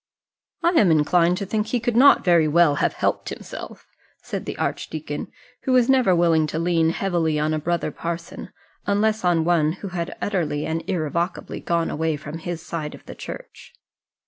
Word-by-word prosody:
"I 340 Hz, -, +5 dB
am 230 Hz, -, +4 dB
inclined 170 Hz, +3 st, +3 dB
to 200 Hz, -, -3 dB
think 210 Hz, +2 st, -1 dB
he 245 Hz, +2 st, 0 dB
could 235 Hz, 0 st, -1 dB
not 275 Hz, +4 st, +6 dB
very 170 Hz, -3 st, +4 dB
well 150 Hz, -2 st, +4 dB
have -, -, +2 dB
helped -, -, -1 dB
himself," -, -, -9 dB, 0.4 s
said -, -, -5 dB
the -, -, -5 dB
archdeacon, 150 Hz, -2 st, -4 dB, 0.4 s
who 260 Hz, -, +2 dB
was 250 Hz, 0 st, +4 dB
never 250 Hz, -9 st, +4 dB
willing 165 Hz, -2 st, +3 dB
to 155 Hz, -, -4 dB
lean 165 Hz, -1 st, +2 dB
heavily 170 Hz, -3 st, 0 dB
on 155 Hz, +1 st, 0 dB
a 155 Hz, -, 0 dB
brother 170 Hz, +3 st, -1 dB
parson, 170 Hz, 0 st, -6 dB, 0.4 s
unless 215 Hz, +1 st, +1 dB
on 170 Hz, -3 st, +2 dB
one 160 Hz, -3 st, +2 dB
who 195 Hz, +2 st, -7 dB
had 175 Hz, -1 st, -4 dB
utterly 165 Hz, -7 st, -1 dB
and 160 Hz, +1 st, -2 dB
irrevocably 170 Hz, 0 st, -2 dB
gone 170 Hz, -1 st, -1 dB
away 160 Hz, 0 st, -1 dB
from 150 Hz, +2 st, -7 dB
his 170 Hz, 0 st, -5 dB
side 155 Hz, -3 st, -4 dB
of -, -, -17 dB
the -, -, -8 dB
Church. -, -, -10 dB
170 Hz, 180 wpm, -23 LUFS, 160-195 Hz, 0.4 s, not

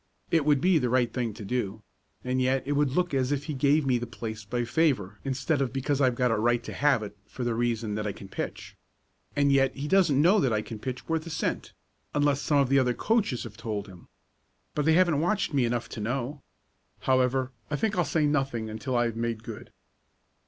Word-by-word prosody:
"It 165 Hz, -4 st, +3 dB
would 145 Hz, -3 st, +3 dB
be 180 Hz, -1 st, +4 dB
the 125 Hz, -3 st, 0 dB
right 120 Hz, -1 st, +2 dB
thing 120 Hz, -3 st, -1 dB
to 110 Hz, -, -8 dB
do, 110 Hz, -2 st, -2 dB, 0.4 s
and 130 Hz, +1 st, 0 dB
yet 130 Hz, +1 st, +1 dB
it 145 Hz, -, -2 dB
would 145 Hz, -1 st, +2 dB
look 175 Hz, +4 st, 0 dB
as 130 Hz, 0 st, +1 dB
if 145 Hz, -1 st, 0 dB
he 150 Hz, 0 st, -4 dB
gave 145 Hz, +2 st, +3 dB
me 125 Hz, -2 st, +2 dB
the 120 Hz, -, -5 dB
place 110 Hz, -2 st, -6 dB
by 120 Hz, +4 st, -2 dB
favor 120 Hz, -, +1 dB
instead 135 Hz, +2 st, 0 dB
of 130 Hz, -3 st, 0 dB
because 135 Hz, +2 st, -1 dB
I've 130 Hz, -2 st, +3 dB
got 125 Hz, -1 st, +2 dB
a 115 Hz, -, +2 dB
right 120 Hz, +1 st, +2 dB
to -, -, -7 dB
have 140 Hz, -6 st, +2 dB
it, 105 Hz, 0 st, -8 dB
for 125 Hz, -, -6 dB
the 120 Hz, -1 st, 0 dB
reason 115 Hz, -2 st, -1 dB
that 105 Hz, 0 st, -2 dB
I -, -, -1 dB
can 100 Hz, -, -10 dB
pitch. -, -, -6 dB, 0.6 s
And 140 Hz, -1 st, +3 dB
yet 135 Hz, -1 st, +3 dB
he 140 Hz, +2 st, -4 dB
doesn't 170 Hz, -6 st, +4 dB
know 180 Hz, +8 st, +5 dB
that 130 Hz, -9 st, +2 dB
I 105 Hz, -1 st, 0 dB
can 110 Hz, -1 st, -8 dB
pitch 130 Hz, +2 st, -5 dB
worth 165 Hz, 0 st, -1 dB
a -, -, -5 dB
cent, -, -, -3 dB, 0.4 s
unless 145 Hz, -1 st, +2 dB
some 145 Hz, -, +2 dB
of 140 Hz, -2 st, +3 dB
the 135 Hz, 0 st, +5 dB
other 125 Hz, -2 st, +1 dB
coaches 210 Hz, -, 0 dB
have 110 Hz, -2 st, -9 dB
told 105 Hz, -3 st, -4 dB
him. 90 Hz, -2 st, -14 dB, 0.7 s
But 150 Hz, -, -1 dB
they 160 Hz, -, +5 dB
haven't 170 Hz, -4 st, +4 dB
watched 185 Hz, 0 st, 0 dB
me 135 Hz, -3 st, +3 dB
enough 120 Hz, 0 st, -1 dB
to 110 Hz, -, -6 dB
know. 130 Hz, +5 st, -3 dB, 0.6 s
However, 130 Hz, 0 st, +2 dB, 0.2 s
I 150 Hz, -, -1 dB
think 220 Hz, +7 st, 0 dB
I'll 175 Hz, -, +2 dB
say 155 Hz, -2 st, +1 dB
nothing 135 Hz, -7 st, 0 dB
until 110 Hz, +4 st, -2 dB
I 120 Hz, -, +3 dB
have 115 Hz, -1 st, -2 dB
made 115 Hz, -1 st, -2 dB
good." 115 Hz, -2 st, -9 dB
130 Hz, 230 wpm, -27 LUFS, 115-145 Hz, 0.7 s, know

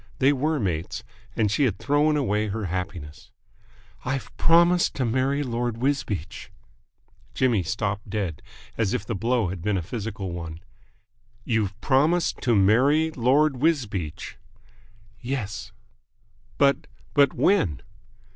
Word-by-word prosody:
They 140 Hz, +2 st, +4 dB
were 150 Hz, +3 st, 0 dB
mates, 95 Hz, +2 st, -3 dB, 0.3 s
and 105 Hz, -3 st, +1 dB
she 145 Hz, -, +2 dB
had 105 Hz, -7 st, 0 dB
thrown 145 Hz, +7 st, +2 dB
away 105 Hz, -6 st, 0 dB
her 105 Hz, +1 st, -3 dB
happiness. 90 Hz, -4 st, -5 dB, 0.7 s
"I've 135 Hz, +1 st, -4 dB
promised 170 Hz, +1 st, +4 dB
to 130 Hz, -, 0 dB
marry 130 Hz, +5 st, +1 dB
Lord 120 Hz, -2 st, -2 dB
Wisbeach!" 115 Hz, -, -2 dB, 0.9 s
Jimmy 120 Hz, -6 st, +2 dB
stopped 100 Hz, +3 st, -3 dB
dead, 95 Hz, -9 st, -3 dB, 0.4 s
as 105 Hz, -4 st, +1 dB
if 100 Hz, -, -3 dB
the 115 Hz, -, -3 dB
blow 115 Hz, 0 st, 0 dB
had 90 Hz, -2 st, -6 dB
been 105 Hz, +2 st, 0 dB
a 90 Hz, -, -2 dB
physical 100 Hz, -1 st, -5 dB
one. 85 Hz, -2 st, -6 dB, 0.8 s
"You've 110 Hz, -4 st, -1 dB
promised 155 Hz, +6 st, +2 dB
to 120 Hz, -3 st, +2 dB
marry 130 Hz, +11 st, +4 dB
Lord 135 Hz, +2 st, +2 dB
Wisbeach!" 120 Hz, -, -1 dB, 0.8 s
"Yes." 110 Hz, -5 st, -4 dB, 0.9 s
"But 140 Hz, -1 st, +3 dB, 0.3 s
but 140 Hz, -2 st, +4 dB
when?" 100 Hz, -, +2 dB
115 Hz, 125 wpm, -25 LUFS, 100-140 Hz, 0.9 s, They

